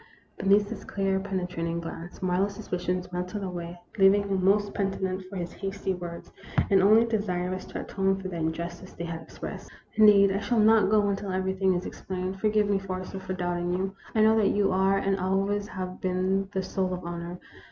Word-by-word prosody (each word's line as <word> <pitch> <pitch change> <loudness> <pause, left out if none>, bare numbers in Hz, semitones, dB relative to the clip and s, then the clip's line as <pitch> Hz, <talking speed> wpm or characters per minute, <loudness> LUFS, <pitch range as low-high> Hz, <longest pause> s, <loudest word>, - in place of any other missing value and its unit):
Beneath 200 +2 +3
his 225 - -6
clear, 195 -1 0
penetrating 180 -4 -2
glance, 170 +2 -8
Marlowe's 190 +2 +1
suspicions 180 -1 -3
melted 180 +3 -3
away, 175 -2 -5 0.2
leaving 195 +1 +6
him 195 -2 -1
most 205 +1 +3
penitent 190 -1 -1
for 200 - -8
his 175 -2 -4
hasty 195 -1 -3
words, 175 -1 -7 0.4
and 195 -1 +6
only 215 +4 +6
desirous 185 -4 -2
to - - -5
atone 195 0 0
for 190 - -5
the 185 - -6
injustice 170 +3 -4
they 170 - -6
had 165 -1 -5
expressed, - - -8 0.2
"Indeed, 205 -2 +7
I 195 - 0
shall 205 +3 0
not 215 -2 +5
go 210 -1 +4
until 200 0 -2
everything 190 0 +1
is 175 - -2
ex - - -8
plained. 185 +1 -4
Forgive 215 0 +2
me, 200 -1 +2
Forrester, 185 0 -5
for 190 0 -5
doubting 175 -1 -1
you. 190 +1 -2 0.2
I 220 - +4
know 220 +1 +6
that 210 -2 +4
you 200 -2 +3
are 190 +1 +3
and 195 0 0
always 195 +2 0
have 185 -1 -6
been 185 +1 0
the 190 -2 -1
soul 185 -1 -1
of 180 - -8
honor. 170 +1 -5
190 Hz, 195 wpm, -27 LUFS, 180-200 Hz, 0.4 s, Indeed